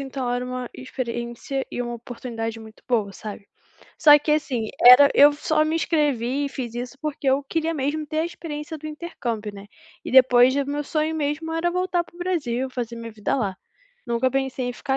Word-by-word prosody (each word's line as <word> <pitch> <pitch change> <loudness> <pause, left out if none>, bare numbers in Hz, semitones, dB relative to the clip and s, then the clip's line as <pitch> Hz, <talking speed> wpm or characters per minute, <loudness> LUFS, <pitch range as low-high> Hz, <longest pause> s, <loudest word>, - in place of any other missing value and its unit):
então 270 -2 -4
era 245 0 -1
uma 250 -1 -5
experiência 245 +1 -4
e - - -4
uma 240 -1 -3
oportunidade 230 -1 -6
muito 220 -1 -14
boa, 215 -5 +1
sabe. 205 0 -9 0.5
Só 295 -3 +8
que 300 +1 0
assim, 260 -7 -1
era 250 +4 +9
eu 290 +1 +8
só 305 +1 +1
me 315 - -1
inscrevi 285 -5 0
e - - -3
fiz 245 -4 -5
isso, 245 +2 -6
porque 295 -2 -2
eu 275 +2 +2
queria 325 +3 -1
mesmo 300 +2 -2
ter 310 +1 -3
a - - 0
experiência 320 -2 -7
do 310 0 -9
intercâmbio, 245 -9 -5
né, 200 0 -10 0.4
e - - -5
depois 255 0 +6
o 280 - +1
meu 290 +1 -2
sonho 310 +2 -1
mesmo 310 +1 -2
era 330 +2 0
voltar 360 0 0
para - - -22
o - - -15
Brasil, 280 -9 -1
fazer 240 -2 -5
minha 230 -1 -7
vida 210 -1 -2
lá, 200 -7 -2 0.5
nunca 235 +2 +1
pensei 265 -1 -2
em 245 - -2
ficar 265 +2 -2
265 Hz, 200 wpm, -23 LUFS, 240-305 Hz, 0.5 s, era